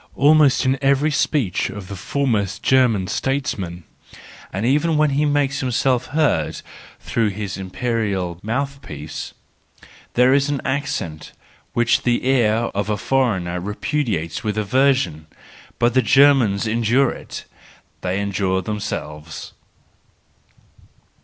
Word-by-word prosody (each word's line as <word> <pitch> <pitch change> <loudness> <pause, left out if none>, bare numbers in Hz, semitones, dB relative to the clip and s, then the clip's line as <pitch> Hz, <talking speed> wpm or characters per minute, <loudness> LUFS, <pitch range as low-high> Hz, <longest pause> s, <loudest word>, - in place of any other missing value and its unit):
Almost 145 -2 +4
in 130 +1 +1
every 140 +2 +2
speech 140 - 0
of 100 -2 -8
the 100 - -6
foremost 105 -2 -1
German 125 -7 +3
statesman, 100 -9 -2 0.7
and 100 +4 -2
even 150 +5 +2
when 150 -1 +3
he 145 +2 +1
makes 145 -1 +1
himself 125 -1 0
heard 145 - 0 0.4
through 115 -2 0
his 100 0 -5
imperial 95 -3 -2
mouth 140 +5 -3
piece, 75 - -7 0.8
there 125 +2 +5
is 140 +1 +2
an 145 -2 -1
accent 110 - -3 0.4
which 120 0 +2
the 120 0 0
ear 115 -3 +2
of 100 +1 -2
a 105 - 0
foreigner 100 -8 0
repudiates 105 - -2
with 105 -1 -2
aversion: 130 - +1 0.5
but 120 0 +2
the 130 - +4
Germans 130 -8 +4
endure 120 +4 +2
it,—they 95 +1 -8
endure 95 -2 -1
themselves. 80 -7 -5
120 Hz, 115 wpm, -21 LUFS, 95-135 Hz, 0.8 s, there